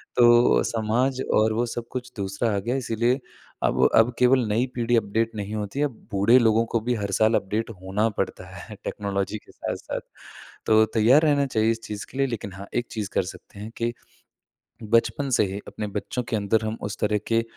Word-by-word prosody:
तो 120 0 +5
समाज 120 +4 0
और 110 0 +3
वो 120 +2 +1
सब 115 0 -5
कुछ 125 -1 -5
दूसरा 100 +4 -1
आ - - +1
गया 120 +6 -2
है 135 - 0
इसीलिए 120 +2 0 0.4
अब - - +1
अब 115 +2 +5
केवल 125 +1 +5
नई 115 +5 +2
पीढ़ी 120 0 +1
अपडेट 115 +2 0
नहीं 105 0 -5
होती 105 +6 -4
है, 150 - +3
अब 140 - -2 0.2
बूढ़े 100 +6 +5
लोगों 115 -1 +3
को 115 - +2
भी 120 +2 0
हर 100 -2 -3
साल 110 +3 +3
अपडेट 105 +4 -1
होना 100 +4 0
पड़ता - - -3
है - - -9
टेक्नोलॉजी 100 0 -2
के - - -18
साथ-साथ। - - -5 0.7
तो 110 0 +5
तैयार 120 +7 +5
रहना 145 -2 +3
चाहिए 110 -2 +2
इस 115 0 -4
चीज़ 105 -2 -6
के 130 - -9
लिए। 135 0 +2
लेकिन 105 -5 -5
हाँ, 95 +2 -9
एक 120 0 -1
चीज़ 105 -4 -4
कर - - +2
सकते 100 - -15
हैं, 110 +2 -7
कि 120 0 -1 0.9
बचपन 115 +5 +1
से - - +3
ही 100 - -4
अपने 105 - -5
बच्चों 105 +5 -4
के 115 - -3
अंदर 105 +2 +1
हम 110 +1 -3
उस 105 0 -4
तरह 105 0 +2
के 115 0 +2
115 Hz, 210 wpm, -25 LUFS, 105-120 Hz, 0.9 s, तो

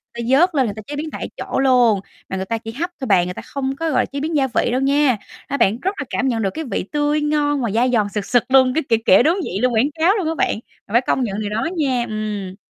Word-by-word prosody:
người 235 - -4
ta 260 +3 +4
vớt 355 -1 +3
lên 265 -3 +3
người 205 -3 -4
ta 215 - -7
chế 290 - -5
biến 305 +2 -4
tại - - -5
chỗ - - -3
luôn, 245 -6 +4 0.3
mà 190 - -3
người 190 - -3
ta 230 +3 -2
chỉ 225 0 -8
hấp 330 +9 -3
thôi 265 - -4
bạn, 185 -4 +4
người 180 - -4
ta - - -8
không 270 -1 -4
có, 325 +3 -2
gọi 255 -4 +2
là, - - -1
chế 280 - -6
biến 310 +2 -2
gia 270 -2 +2
vị 240 -1 0
đâu 255 - 0
nha. 275 -2 +3 0.3
A, 280 - -2
bạn 215 -3 +2
rất 385 +3 -1
là 275 - -3
cảm 265 +2 -1
nhận 230 -3 0
được 195 - +1
cái 320 - -4
vị - - -1
tươi 295 0 +1
ngon 295 -1 +1
và 230 -5 -1
dai 240 +4 +2
giòn 215 -4 +2
sực 205 0 -3
sực 245 -2 +2
luôn, 260 -1 +5
cái, 320 - 0
kiểu, 225 -1 +3
kiểu, 190 +5 +6
đúng 330 +6 +2
vị 190 - -3
luôn, 250 -1 +2
quảng 250 +7 +2
cáo 360 +6 +4
luôn 375 -7 -1
á 325 - -1
bạn, 215 - 0 0.3
mà - - -14
phải 235 - +5
công 265 - 0
nhận 205 -3 -3
điều 210 -1 -3
đó 220 +8 -1
nha. 260 -5 +1
Ừm. 210 -3 -4
255 Hz, 310 wpm, -20 LUFS, 220-290 Hz, 0.3 s, kiểu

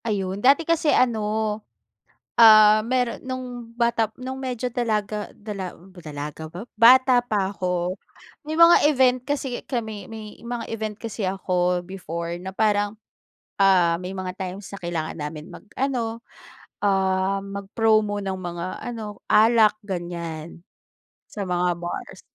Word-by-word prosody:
Ayun. 195 -3 -2
Dati 280 +7 +5
kasi 325 -2 +1
ano, 240 -6 +3 1.2
ah, 215 -1 +8
mayroon 245 +1 -1
no'ng 245 -2 -6
bata 235 -2 +2
no'ng 260 +1 -6
medyo 250 -2 -3
dalaga 215 -3 -1
dala 200 -4 -6 0.2
dalaga 150 0 -7
ba? 175 +6 -8 0.2
Bata 255 +1 +7
pa 205 -5 -1
ako. 180 0 -2 0.5
May 310 - -2
mga 335 -2 +7
event 255 -3 +4
kasi 270 -1 -3
kami 220 -5 -4
may 220 -1 -9
mga 235 0 -5
event 215 -2 -4
kasi 220 -3 -4
ako 180 -2 0
before 170 -2 -5
na 190 +1 -8
parang, 205 -1 +1 0.6
ah, 180 -4 +4
may 185 +1 -6
mga 185 -1 -4
times 190 +1 -6
na 200 - -7
kailangan 170 -3 -4
namin 150 +2 -6
mag-ano, 230 0 -3 0.6
um, 190 0 +1
mag-promo 205 +1 +1
ng 190 -1 -3
mga 175 -1 -5 0.2
ano, 220 -4 -6
alak 220 -1 +5
ganyan. 170 -4 -6 0.7
Sa 205 - -4
mga 180 0 +1
bars. 175 0 -6
210 Hz, 130 wpm, -24 LUFS, 185-235 Hz, 1.2 s, ah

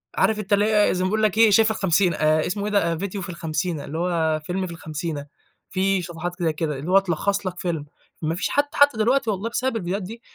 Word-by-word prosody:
عارف 220 -1 +2
أنت 205 0 -2
اللي 205 +1 +4
هي 210 -1 +3
زي 185 - -1
ما 185 - +1
بيقول 215 +2 0
لَك 215 -1 +2
إيه 225 -1 +6
شاي 220 +3 +6
في 220 - +2
الخمسينة، 190 -3 +2
آآ 155 0 +2
اسمه 200 +2 -2
إيه 210 - -2
ده؟ 170 -5 +1
فيديو 195 +2 -4
في 180 - -6
الخمسينة، 165 -2 -3
اللي 155 - -5
هو 165 -3 0
فيلم 185 +2 -2
في - - -8
الخمسينة. 155 -2 -5 0.5
في 195 0 +1
صفحات 175 0 -5
كده 165 -2 +1
كده، 150 -2 -3
اللي 155 +6 -4
هو 195 - +7
تلخص 195 +2 -1
لَك 180 -1 -5
فيلم، 165 -5 -2 0.4
ما 160 0 -1
فيش 180 - -2
حد 285 - +3
حتى 285 -4 +4
دلوقتي 235 +2 +2
والله 205 +3 -3
بسبب 255 +2 -1
الفيديوهات 190 0 -3
دي، 225 +5 -8
185 Hz, 245 wpm, -23 LUFS, 165-210 Hz, 0.5 s, هو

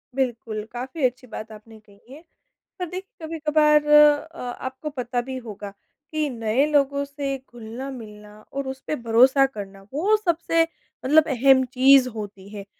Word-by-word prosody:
बिल्कुल। 230 -5 -2
काफ़ी 260 +5 -6
अच्छी 255 +1 -2
बात 220 -1 -8
आपने 220 +1 -13
कही 210 +4 -19
है। 310 +4 -13 0.6
पर 360 - -2
देखिए 370 -3 -8
कभी-कभार 300 -1 +2
अ, 300 +2 +5
आपको 260 +4 -6
पता 250 -3 -3
भी 260 +1 -6
होगा, 210 -4 -8 0.4
कि 310 -2 -1
नए 230 +3 +1
लोगों 280 -1 +1
से 280 -1 -4
घुलना-मिलना 225 -4 -10
और 275 -1 -3
उस 265 0 -5
पे 305 - -1
भरोसा 250 +3 +4
करना, 200 -6 -8
वो 385 +9 +2
सबसे, 335 -4 +1 0.4
मतलब 310 +3 +5
अहम 265 +1 +4
चीज़ 265 0 +6
होती 205 -3 -8
है। 200 -1 -7
265 Hz, 150 wpm, -23 LUFS, 230-295 Hz, 0.6 s, चीज़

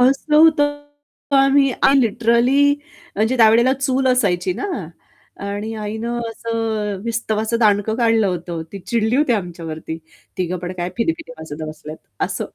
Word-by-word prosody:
हसलं 275 +4 +3
होतं 290 -2 +4 0.5
आम्ही 275 0 +4
आणि 275 0 +5
लिटरली 235 +5 +3 0.5
म्हणजे 220 +5 +1
त्यावेळेला 230 +2 +5
चूल 265 0 0
असायची 190 -8 +1
ना 190 - -5 0.8
आणि 205 +2 -4
आईनं 220 +3 -4
असं 225 -3 -3
विस्तवाचं 225 -1 -1
दांडकं 210 -1 +2
काढलं 225 -3 +3
होतं. 175 -2 -3
ती 200 - -6
चिडली 220 +5 0
होती 285 -3 +2
आमच्यावरती 165 -5 -4 0.4
तिघं 185 0 -1
पण 175 +1 -5
काय 175 0 -3
फिदीफिदी 315 +3 -2
हसत 160 -1 -8
बसलेत 155 0 -9 0.2
असं. - - -1
225 Hz, 135 wpm, -20 LUFS, 195-255 Hz, 0.8 s, आणि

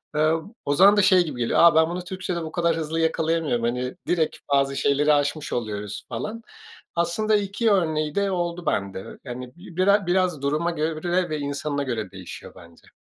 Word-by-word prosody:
Iıı, 155 +2 +2 0.2
o 145 - +1
zaman 200 +6 +6
da - - +6
şey 185 -2 +5
gibi 140 -6 -6
geliyor. 115 - +1
A, 170 -2 +7
ben 160 0 +4
bunu 175 +1 -4
Türkçede 180 -1 -4
bu 160 - -6
kadar 170 -1 +1
hızlı 160 0 -2
yakalayamıyorum. 160 -5 0
Hani, 125 +2 -2
direkt 165 -3 0 0.2
bazı 140 0 +2
şeyleri 145 +2 +3
aşmış 145 +1 -1
oluyoruz 105 -3 -4
falan. 210 - -5 0.5
Aslında 175 +6 +1
2 205 +2 +1
örneği 155 -5 +1
de 200 -1 +1
oldu 175 -1 -2
bende, 95 -1 -3
yani, 125 0 -7
bi 175 -1 -13
bira 200 +1 +3
biraz 180 -4 +1
duruma 150 +5 0
göre 165 +3 -1
ve 155 -1 -2
insanına 145 0 -2
göre 120 -8 -3
değişiyor 95 -2 -10
bence. 85 -2 -17
160 Hz, 180 wpm, -24 LUFS, 140-175 Hz, 0.5 s, A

